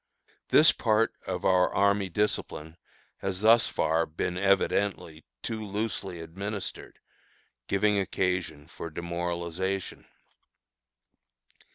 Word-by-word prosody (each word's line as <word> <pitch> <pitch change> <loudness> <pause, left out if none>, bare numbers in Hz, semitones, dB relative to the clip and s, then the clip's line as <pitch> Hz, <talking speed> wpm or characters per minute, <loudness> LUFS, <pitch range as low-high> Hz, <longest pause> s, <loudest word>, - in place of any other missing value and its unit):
This - - +7
part 110 0 +1
of - - -3
our 90 -1 +4
army 100 -1 +2
discipline 80 -4 -2 0.4
has 95 -1 -3
thus 115 +2 +6
far 80 +1 +1
been 85 +3 -3
evidently 100 -4 0 0.2
too 110 -1 -3
loosely 100 -4 -3
administered, 100 +5 -6 0.7
giving 105 +1 +2
occasion 90 -6 -1
for 85 -1 -7
demoralization. 85 +3 -3
95 Hz, 90 wpm, -28 LUFS, 85-100 Hz, 0.7 s, This